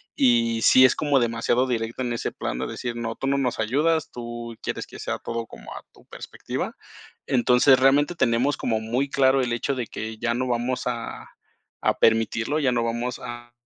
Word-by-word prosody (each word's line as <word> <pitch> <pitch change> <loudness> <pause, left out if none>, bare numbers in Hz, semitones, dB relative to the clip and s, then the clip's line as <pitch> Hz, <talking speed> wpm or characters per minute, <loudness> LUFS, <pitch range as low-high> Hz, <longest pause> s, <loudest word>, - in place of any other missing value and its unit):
Y 115 -3 +3
sí 130 +3 +7
es 130 - +4
como 145 -3 +2
demasiado 120 +2 +1
directa 115 0 -2
en 120 -1 -2
ese 115 - -3
plan - - -4
de 65 - -2
decir: 120 -1 -5
"No, 115 -1 -4
tú - - -5
no 140 0 +2
nos 125 -3 -1
ayudas, 150 +9 +1
tú 120 -1 -7
quieres - - -4
que - - -12
sea - - -3
todo 115 -1 -5
como - - -11
a - - -9
tu - - -21
perspectiva". - - -6 0.5
Entonces, 130 0 +4
realmente, 145 +5 +3
tenemos 125 0 +2
como 110 -2 -1
muy 125 +5 -1
claro 135 0 +3
el 125 -2 -1
hecho 135 +4 -1
de 125 -3 -3
que 110 0 -6
ya 115 0 0
no 130 +1 -1
vamos 125 +1 -1
a, 120 -1 -5 0.5
a - - +1
permitirlo, 115 +5 +2
ya 135 -4 +2
no 120 -1 0
vamos 120 +2 -2
a, 120 0 -8
120 Hz, 195 wpm, -24 LUFS, 115-130 Hz, 0.5 s, sí